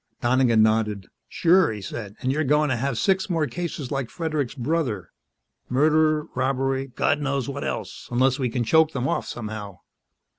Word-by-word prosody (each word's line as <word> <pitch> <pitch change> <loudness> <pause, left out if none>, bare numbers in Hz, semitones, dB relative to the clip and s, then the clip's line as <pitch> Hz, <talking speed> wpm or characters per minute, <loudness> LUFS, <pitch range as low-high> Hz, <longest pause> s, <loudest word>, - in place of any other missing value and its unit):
Donegan 120 -2 +3
nodded. 105 -3 0 0.2
"Sure," 180 -2 +4
he 105 - -5
said. 105 +1 -7
"And 130 - 0
we're 155 +3 0
going 150 +1 +2
to 130 - +1
have 130 +1 -2
six 190 +4 +1
more 165 -3 +1
cases 160 -5 -5
like 135 -4 -2
Fredericks' 155 -6 -2
brother 125 - -2 0.6
murder, 155 +3 +3
robbery, 135 +1 0
God 145 +3 0
knows 140 -2 -1
what 140 0 -4
else - - -5
unless 130 +2 +2
we 130 -2 0
can 120 +1 -1
choke 160 +6 +4
them 130 -1 -1
off - - -1
somehow." 105 -5 -6
135 Hz, 170 wpm, -24 LUFS, 120-155 Hz, 0.6 s, Sure